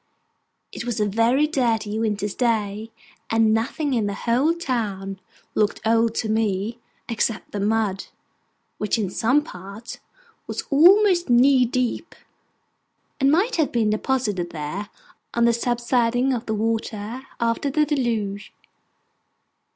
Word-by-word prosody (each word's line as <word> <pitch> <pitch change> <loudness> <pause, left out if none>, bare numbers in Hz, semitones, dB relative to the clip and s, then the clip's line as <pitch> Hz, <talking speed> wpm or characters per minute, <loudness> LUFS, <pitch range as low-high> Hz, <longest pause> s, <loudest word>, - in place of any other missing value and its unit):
It - - -6
was 240 -3 -3
a 210 - +2
very 230 +8 +2
dirty 225 -8 0
winter's 210 -2 -1
day, 220 -3 -1 0.4
and 225 -1 +3
nothing 270 +6 -1
in 225 -4 +1
the 200 - -3
whole 255 +10 +1
town 205 - -3 0.3
looked 210 -1 +1
old 230 0 +2
to 225 - -1
me, 215 +1 -1 0.3
except 225 -1 -2
the 205 - -4
mud, 205 -1 0 0.7
which 210 +2 0
in 200 -5 -2
some 255 +8 +2
parts 200 +2 -9 0.5
was - - -4
almost 355 +3 +5
knee 255 +1 +5
deep, 255 +6 -2 1.0
and 270 -1 +4
might 395 +9 +2
have 315 -4 +1
been 225 -3 +1
deposited 215 -6 -1
there, 170 +7 -5 0.5
on 235 0 +3
the 235 - +4
subsiding 240 +2 +1
of 235 -2 -4
the 220 - -1
waters 220 +1 -2 0.2
after 235 +4 0
the 300 +2 +2
Deluge. 225 -8 -2
230 Hz, 130 wpm, -23 LUFS, 210-255 Hz, 1.0 s, almost